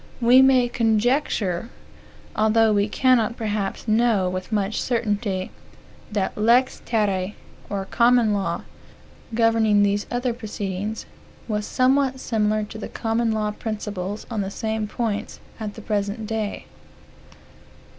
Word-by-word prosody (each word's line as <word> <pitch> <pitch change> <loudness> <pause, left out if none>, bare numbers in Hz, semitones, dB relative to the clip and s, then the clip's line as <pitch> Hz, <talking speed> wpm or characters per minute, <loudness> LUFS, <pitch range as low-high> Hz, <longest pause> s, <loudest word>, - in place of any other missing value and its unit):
We 250 +2 +6
may 260 -2 +5
conjecture, 230 - 0 0.7
although 220 0 +3
we 205 +1 +1
cannot 240 -1 +2
perhaps 210 -1 -3
know 220 -3 +3
with 185 +2 -5
much 205 0 0
certainty, 210 -5 -1 0.6
that 205 -2 -1
the - - -6
lex 245 +4 +3
terrae, 205 -3 0 0.3
or 195 -1 -3
common 235 0 +3
law, 200 -1 -2 0.7
governing 225 -3 +4
these 205 0 0
other 245 0 -1
proceedings, 210 -2 -4 0.4
was 210 -2 -2
somewhat 265 +1 +2
similar 215 -3 0
to 215 +1 -8
the - - -6
common 225 0 0
law 215 -1 0
principle, 210 -2 -4
on 220 -3 -1
the 195 - -3
same 220 +1 -3
points, 215 -1 -3 0.2
at 210 -2 -5
the 220 - -9
present 210 +1 -2
day. 215 -1 -3
215 Hz, 125 wpm, -23 LUFS, 205-235 Hz, 0.7 s, We